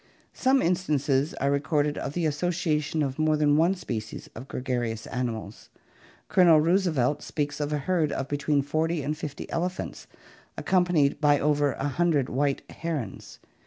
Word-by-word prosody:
Some 265 +1 +2
instances 150 -5 +1
are 140 - 0
recorded 145 +1 +1
of 140 - -4
the 175 0 -1
association 155 -1 0
of 135 +1 -3
more 155 0 +3
than 145 -1 +3
one 170 +5 +3
species 110 - -6
of 125 +4 -9
gregarious 120 -4 -3
animals. 115 -5 -5 0.6
Colonel 170 -4 +6
Roosevelt 155 -5 +2
speaks 145 -1 -3
of 145 0 -2
a 150 - +1
herd 155 +1 0
of 135 - -3
between 145 0 0
forty 155 +2 -1
and 150 +3 -2
fifty 150 -2 -6
elephants, 180 +2 -3 0.5
accompanied 175 -6 +2
by 145 -1 +4
over 145 -1 +2
a 140 - -3
hundred 145 -2 +1
white 140 +2 0
herons. 150 - -5
150 Hz, 150 wpm, -26 LUFS, 140-165 Hz, 0.6 s, Colonel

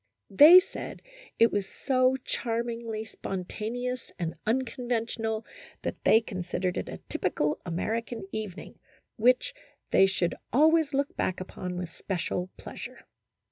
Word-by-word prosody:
They 305 - +10
said 370 - -7 0.3
it 230 0 +5
was 200 -2 -1
so 255 -1 +2
charmingly 230 -1 -2
spontaneous 225 +6 -4
and 170 -2 -2
uncon 245 +1 -1
ventional 225 -1 -1 0.4
that - - -4
they 220 - +6
considered 180 -3 -3
it - - -3
a - - -6
typical 150 0 -1
American 220 +4 -3
evening, 210 -4 -6 0.4
which 250 - +3 0.4
they 195 - +6
should 185 -3 0 0.2
always 310 +2 +4
look 280 +1 0
back 185 - -1
upon 180 -1 -5
with 180 -2 -4
special 180 0 -3
pleasure. - - -9
225 Hz, 125 wpm, -28 LUFS, 190-250 Hz, 0.4 s, They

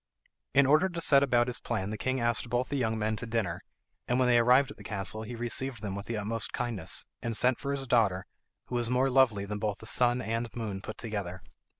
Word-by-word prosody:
In 140 0 +6
order 155 +7 +4
to 170 -2 -5
set 140 -4 +5
about 120 -3 +3
his 125 -1 -3
plan 95 +2 -3
the - - -3
king 130 0 -1
asked 120 0 +1
both 120 +2 -1
the 145 - -2
young 110 -4 0
men 110 0 -1
to 115 - -6
dinner, 110 -7 -2 0.5
and 125 - +1
when 130 -1 +3
they 120 -1 +5
arrived 125 +4 +4
at - - -12
the - - -12
castle 105 +1 -2
he 115 +2 -7
received 120 0 -1
them 100 -2 -3
with 100 0 -6
the 115 - -3
utmost 105 +1 -1
kindness, 115 -8 -2 0.2
and 115 -2 -1
sent 125 0 +2
for 140 - -3
his 140 -1 -2
daughter, 105 -7 +2 0.4
who - - -10
was 120 -1 0
more 130 +2 +2
lovely 120 -7 +3
than 105 +1 -5
both 105 -1 -2
the - - -12
sun 120 +1 +3
and 115 0 -2
moon 105 -5 -4
put 110 - -8
together. 100 -6 -5
115 Hz, 240 wpm, -29 LUFS, 105-125 Hz, 0.5 s, In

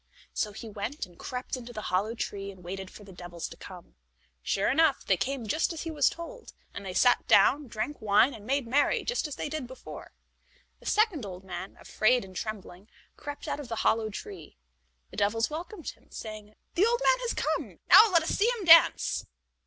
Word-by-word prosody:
So 210 - -1
he 220 +3 -9
went 215 +6 -5
and 175 -2 -21
crept 250 +1 -4
into 245 -1 -9
the 215 -2 -6
hollow 210 +5 +1
tree, 200 -3 -4
and 190 -2 -12
waited 190 +2 -6
for 210 - -13
the 195 - -13
devils 175 -1 -7
to - - -11
come. 180 -3 -12 0.5
Sure 195 - 0
enough, 280 +1 +3
they 195 - +3
came 260 +5 -3
just 310 +13 0
as 320 - -6
he 330 - -4
was 295 -3 +3
told, 465 +9 -9 0.2
and - - -7
they 190 -2 -5
sat 245 - +4
down, 285 +1 +5
drank 230 +6 -4
wine, 215 +6 +4
and 215 - -11
made 275 +3 0
merry 275 +5 +2
just 485 -9 -1
as 295 - -6
they - - -4
did 295 -4 -4
before. 260 +1 -10 0.7
The - - -12
second 425 - +2
old 185 -2 -8
man, 185 0 -7
afraid 240 0 +2
and 190 -1 -14
trembling, 205 -1 -7 0.3
crept 290 -1 -8
out - - -2
of 290 - -7
the 230 - -4
hollow 220 -1 +2
tree. 185 - -9 0.5
The - - -11
devils 225 +5 +1
welcomed 335 +3 -6
him, - - -25
saying: 215 -1 -9 0.2
"The 375 - +3
old 475 +1 +1
man - - +4
has 485 -1 -2
come; - - -2
now 435 -1 +9
let 335 -3 +4
us 320 - -3
see 435 +4 +2
him 405 - -6
dance." 330 0 +6
230 Hz, 205 wpm, -28 LUFS, 200-300 Hz, 0.7 s, now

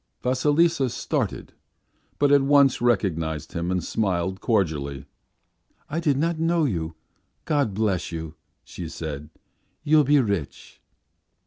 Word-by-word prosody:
Vasilisa 145 +3 +2
started, - - -3 0.6
but 145 -1 +3
at 145 -1 +6
once 140 -2 +4
recognized 85 -10 0
him 85 +1 -2
and 90 -1 -1
smiled 95 -3 -1
cordially. 75 - -1 0.9
"I 160 - -1
did 150 -5 +1
not 165 +2 0
know 165 0 +2
you; 85 - -2 0.5
God 140 -10 0
bless 100 -6 0
you," 80 -2 -6 0.3
she 85 -3 -8
said. 75 -3 -6 0.5
"You'll 150 0 +5
be 145 +1 +4
rich." 100 - -3
110 Hz, 120 wpm, -24 LUFS, -, 0.9 s, at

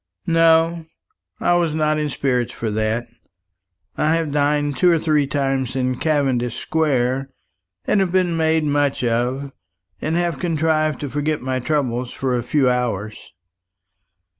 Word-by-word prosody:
"No, 165 0 +3 0.5
I - - +2
was 170 -3 +1
not 155 -1 +1
in 150 -1 -1
spirits 125 -3 -1
for 110 -2 -4
that. 110 +2 -1 0.9
I 155 +2 +2
have 165 -3 -1
dined 145 0 +1
two 180 +7 +4
or 170 - +4
three 155 -3 +1
times 135 -2 -1
in 130 -1 -1
Cavendish 135 -6 0
Square, 135 -4 0 0.6
and 210 - +2
have 190 -3 +1
been 180 -2 +1
made 160 -1 +2
much 145 -2 0
of, 125 +4 -1 0.5
and 160 - -1
have 170 -5 -1
contrived 155 -2 0
to 145 - -3
forget 150 -1 -1
my 130 0 -1
troubles 125 -3 -1
for 130 -2 -2
a 120 - 0
few 135 +2 +1
hours." 115 -4 -1
145 Hz, 145 wpm, -21 LUFS, 125-160 Hz, 0.9 s, two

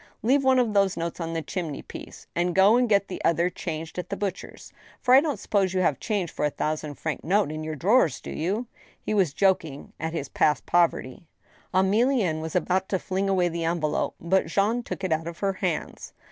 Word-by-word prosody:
Leave 270 +5 +3
one 265 -1 +4
of 240 -4 +2
those 195 -2 +2
notes 170 +1 -4
on 165 -1 -3
the 165 -1 -2
chimney 160 -4 -4
piece,... - - -10
and 175 0 0
go 195 +4 +6
and 245 -1 +2
get 200 -1 +3
the 185 - -6
other 170 +2 +2
changed 165 -1 -5
at 180 - -6
the 200 - -3
butcher's, 195 -2 -5 0.3
for 250 - +3
I 265 - +9
don't 300 -3 -2
suppose 190 -3 0
you 185 - +2
have 155 -6 +1
change 200 -7 -2
for - - -4
a 150 - +3
thousand 150 0 -3
franc 160 +1 -4
note 185 -1 +2
in 155 0 -5
your 155 0 -4
drawers, 180 - +3
have - - -5
you? 200 +9 -2 0.2
" - - -30
He - - -1
was 190 -8 +2
joking 165 -5 0
at 160 +1 -3
his 145 -4 -3
past 150 +1 +1
poverty. 170 -4 +1 0.4
Emilienne 195 - +2
was 160 +1 -6
about 185 +2 +1
to 190 - +1
fling 190 +2 -2
away 185 -2 +2
the 170 -1 -3
envelope, 165 -2 -1
but 185 +2 +1
Jean 205 +8 +1
took 215 - -7
it 185 - -1
out 160 +1 0
of 170 0 -6
her 195 -1 0
hands. 180 -4 -4
180 Hz, 220 wpm, -26 LUFS, 160-200 Hz, 0.4 s, I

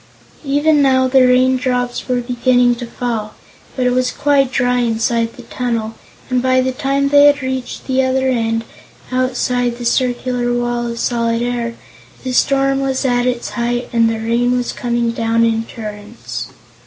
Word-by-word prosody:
Even 290 +1 +2
now 260 -1 +3
the 255 0 +4
raindrops 250 -1 +1
were 250 -1 0
beginning 245 0 +2
to 240 0 -6
fall, 230 -3 -4 0.4
but 255 - -1
it 250 - +3
was 250 0 +1
quite 275 -2 +1
dry 245 0 +1
inside 230 0 0
the 245 - -12
tunnel 230 -2 -3 0.3
and 255 -1 0
by 255 0 +2
the 260 0 +1
time 275 +1 0
they 285 0 +6
had 290 -2 +2
reached 260 -1 -4
the 265 0 +1
other 260 0 +1
end, 225 -3 0 0.5
outside 250 -1 0
the 240 - -6
circular 245 0 0
Wall 240 0 -1
of 235 0 -5
Solid 230 -1 0
Air, 240 -1 -2 0.5
the 255 - -3
storm 275 +1 +2
was 270 0 -1
at 245 -1 +1
its 245 -1 -2
height 240 +1 -2
and 230 -1 +3
the 225 - -2
rain 235 +2 +1
was 245 - -2
coming 235 -1 -1
down 230 0 +1
in 225 0 0
torrents. 210 -1 -7
245 Hz, 165 wpm, -17 LUFS, 235-260 Hz, 0.5 s, they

